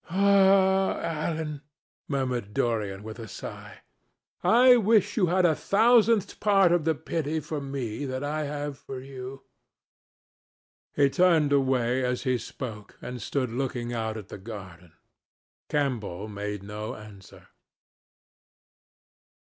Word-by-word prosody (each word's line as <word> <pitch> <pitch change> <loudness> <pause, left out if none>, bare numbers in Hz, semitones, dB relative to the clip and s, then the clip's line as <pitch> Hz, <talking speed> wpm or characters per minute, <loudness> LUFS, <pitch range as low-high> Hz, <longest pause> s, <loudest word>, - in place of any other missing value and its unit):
"Ah, 195 0 +4
Alan," 155 -2 -3 0.5
murmured 125 -7 -2
Dorian 105 -4 -1
with 110 +2 -8
a 115 - -7
sigh, 95 - -9 0.6
"I 250 +2 +7
wish 210 -2 +3
you 190 -6 +3
had 180 +1 +3
a 165 - +4
thousandth 225 +3 +3
part 195 -4 +4
of 175 -3 +2
the 160 -1 +2
pity 160 0 -2
for 150 0 -5
me 135 -2 -4
that 130 0 -4
I 150 +1 -2
have 145 -1 -5
for 130 - -7
you." 130 0 -9 1.5
He 140 - +4
turned 165 -5 +3
away 130 -2 +2
as 125 0 -1
he 130 -3 +1
spoke 110 -4 -8
and 125 -1 -7
stood 130 +1 -2
looking 120 -1 -3
out 110 -1 -2
at 105 -3 -9
the - - -8
garden. 95 -5 -10 0.8
Campbell 110 -9 -2
made 105 -1 -5
no 105 +2 -6
answer. 105 -3 -14
135 Hz, 125 wpm, -27 LUFS, 115-170 Hz, 1.5 s, I